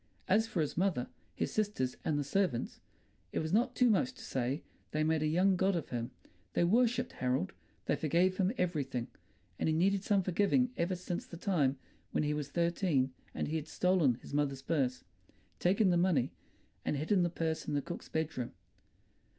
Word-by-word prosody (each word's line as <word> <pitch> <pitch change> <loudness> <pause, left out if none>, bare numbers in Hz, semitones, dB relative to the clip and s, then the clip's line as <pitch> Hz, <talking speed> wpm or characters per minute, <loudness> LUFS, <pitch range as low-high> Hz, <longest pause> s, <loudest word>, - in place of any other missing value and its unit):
As 220 +4 +3
for 180 - -1
his 150 - -1
mother, 175 -9 0 0.3
his - - -1
sisters, 205 -12 0
and 150 - +1
the 145 - 0
servants, 160 -4 0 0.5
it - - -4
was 160 +2 -1
not 240 +4 +2
too 250 - +4
much 245 +4 +3
to - - -11
say 130 +3 -2 0.3
they 155 0 0
made 160 0 +2
a 155 - +2
young 185 +5 +3
god 190 +1 +2
of 165 - -3
him; 120 -1 -3 0.4
they - - +3
worshipped 245 +6 +3
Harold, 125 -7 -1 0.3
they - - +2
forgave 175 +5 +2
him 190 0 +2
everything; 140 -9 -1 0.5
and - - +1
he 155 - +2
had - - +1
needed 195 +2 +2
some 200 -2 +2
forgiving 205 +8 +2
ever 175 +2 0
since 175 0 -4
the 170 - -9
time 155 -8 +1 0.4
when - - +2
he 150 0 +1
was 150 -2 -3
thirteen 170 -5 +1 0.2
and - - -1
he 160 - 0
had 155 -1 -5
stolen 180 -8 +3
his - - -10
mother's 140 -2 0
purse, 135 -6 0 0.6
taken 190 +2 +3
the 175 - +3
money, 170 -8 +2 0.5
and 150 - 0
hidden 180 +7 +2
the 175 - +2
purse 160 -1 -2
in 150 - -1
the 145 - +1
cook's - - -7
bedroom. 155 -6 -2
170 Hz, 190 wpm, -33 LUFS, 145-190 Hz, 0.6 s, too